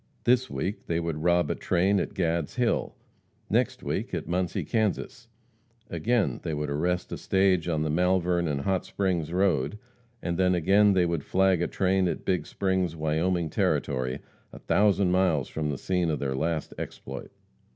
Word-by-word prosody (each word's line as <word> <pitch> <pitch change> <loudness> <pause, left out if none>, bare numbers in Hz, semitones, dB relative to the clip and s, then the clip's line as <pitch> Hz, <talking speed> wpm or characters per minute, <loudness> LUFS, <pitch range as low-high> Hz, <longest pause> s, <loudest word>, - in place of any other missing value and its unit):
This 125 +1 +3
week 100 +3 -4
they 85 0 0
would 85 -2 -3
rob 85 +1 +2
a - - +2
train 95 +3 +1
at - - -3
Gad's 85 -3 -1
Hill, 125 -2 0 0.6
next - - +1
week - - -2
at - - -4
Muncie, 90 0 -1
Kansas; 115 +2 -2 0.6
again, 110 +6 0
they 80 -3 -3
would 75 -1 -3
arrest 90 +5 -1
a - - -3
stage 95 -3 +2
on 80 -3 0
the 80 - -1
Malvern 90 0 +2
and 70 -2 -1
Hot 95 +5 0
Springs 90 -5 -1
road, 90 -2 +1 0.4
and 85 -3 -3
then 90 -1 +3
again 100 +4 +4
they 90 -2 +3
would 85 -4 -1
flag 95 -2 +2
a - - +1
train 95 -1 +1
at - - -3
Big 90 -2 0
Springs, 95 -3 -1
Wyoming 80 +2 0
Territory, 65 0 0 0.3
a - - -11
thousand 100 -2 +2
miles 90 -8 +2
from 75 -1 -2
the 70 - -2
scene 90 +1 0
of 75 - 0
their 70 -2 -2
last 80 +3 -2
exploit. - - -7
90 Hz, 170 wpm, -27 LUFS, 80-95 Hz, 0.6 s, again